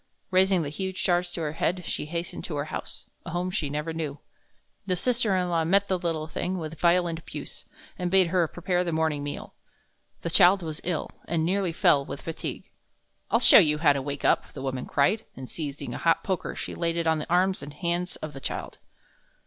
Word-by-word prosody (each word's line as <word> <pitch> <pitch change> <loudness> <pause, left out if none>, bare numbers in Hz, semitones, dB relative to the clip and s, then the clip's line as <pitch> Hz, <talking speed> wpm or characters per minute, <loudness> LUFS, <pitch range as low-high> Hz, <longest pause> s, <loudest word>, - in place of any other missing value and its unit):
Raising 185 -1 +4
the 145 - -3
huge 190 +4 -3
jars 175 0 +2
to 170 - -3
her 150 -2 -1
head, 180 +3 -1
she - - -3
hastened 170 +2 -4
to 160 - -4
her 145 0 -1
house - - -6 0.2
a - - -7
home 175 +2 -2
she 150 -5 -1
never 150 +3 -3
knew. 155 -3 -4 0.7
The 185 - +2
sister 230 +1 +2
in 180 -1 +1
law 165 -1 +2
met 195 +5 +3
the 185 -1 +1
little 165 -3 -2
thing 180 +3 -3
with 160 -2 -6
violent 170 -1 +3
abuse, - - -9 0.3
and 180 -1 -1
bade 190 -2 +4
her 175 -2 +2
prepare 180 +2 -1
the 175 - -2
morning 160 -2 0
meal. 145 - -6 0.7
The 170 - -2
child 185 +1 +6
was 155 -2 -5
ill, 175 -3 -2
and 160 -1 0
nearly 190 0 +1
fell 165 -5 +4
with 140 - -7
fatigue. 165 - -5 0.6
"I'll - - +3
show - - +9
you 150 -5 +4
how 150 -2 +5
to 140 - -2
wake 140 +1 -4
up!" - - +2
the - - -7
woman 130 -1 -3
cried, 195 +10 +2
and, 130 -1 -8
seizing 145 -1 -5
a - - -5
hot 165 -1 +2
poker, 190 -3 -2
she - - -5
laid 170 0 -1
it 170 - 0
on 160 -1 +2
the 150 - -6
arms 185 +2 +2
and 145 +1 -8
hands 175 +4 -2
of 155 -1 -7
the 135 - -9
child. - - -5
170 Hz, 215 wpm, -27 LUFS, 155-180 Hz, 0.7 s, show